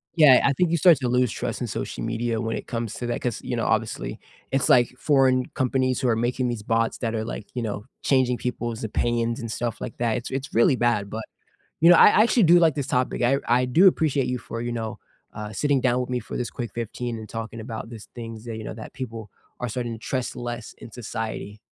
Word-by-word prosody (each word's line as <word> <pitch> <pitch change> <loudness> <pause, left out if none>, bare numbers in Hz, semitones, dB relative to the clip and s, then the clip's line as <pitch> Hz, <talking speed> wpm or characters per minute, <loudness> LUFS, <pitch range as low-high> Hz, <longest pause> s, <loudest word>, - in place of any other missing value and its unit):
Yeah, 150 -6 +7
I 140 - +3
think 170 +4 +1
you 170 - +3
start 170 -2 +6
to 130 -1 -2
lose 125 -1 +2
trust - - -4
in - - -1
social - - -4
media 115 0 -1
when 115 -1 -2
it - - -8
comes 115 -2 -3
to 125 - -5
that 120 - -2
'cause, 120 -3 -2
you - - -3
know, - - -1
obviously, - - -1 0.3
it's 135 -1 +1
like 120 -1 +5
foreign 130 -3 +3
companies 130 -1 0
who 130 - +1
are 115 - +3
making 125 +2 0
these 120 -3 -3
bots 115 +1 0
that 115 -2 -2
are, 110 - -1
like, 110 -2 -6
you 125 - -3
know, 105 -2 -4 0.2
changing 130 -3 +2
people's 120 -2 -4
opinions 115 +1 0
and 115 -1 -5
stuff 120 0 -3
like 125 - -6
that, 115 -1 0
it's 120 - -6
it's 135 +1 -4
really 115 +3 +4
bad, 120 -5 +1
but, 110 +2 -5 0.6
you 165 - +7
know, 175 - +9
I - - +8
I 215 - +5
actually 235 0 +3
do 175 +1 +7
like 165 -4 +4
this 140 -3 -2
topic, 125 0 0
I 125 +3 +3
I 125 +2 +3
do 165 +10 +5
appreciate 145 -7 +2
you 125 0 -1
for, 115 0 -6
you 120 0 -3
know, 115 -2 -4 0.4
uh, 105 0 -6
sitting 140 +5 +1
down 125 -1 +2
with 125 - -3
me 125 -1 0
for 110 - -6
this 125 - -2
quick 120 -4 -5
15 120 +1 -4
and 110 -1 -8
talking 115 +1 -6
about 115 0 -6
these 115 -3 -10
things 115 -2 -8
that, 115 -2 -5
you 110 - -6
know, - - -5
that 110 0 -10
people 115 -5 -7 0.3
are 125 - -2
starting 120 +1 -3
to 110 - -8
trust 130 +2 -3
less 120 -2 -6
in 115 - -11
society. 110 -3 -5
120 Hz, 245 wpm, -24 LUFS, 115-130 Hz, 0.6 s, know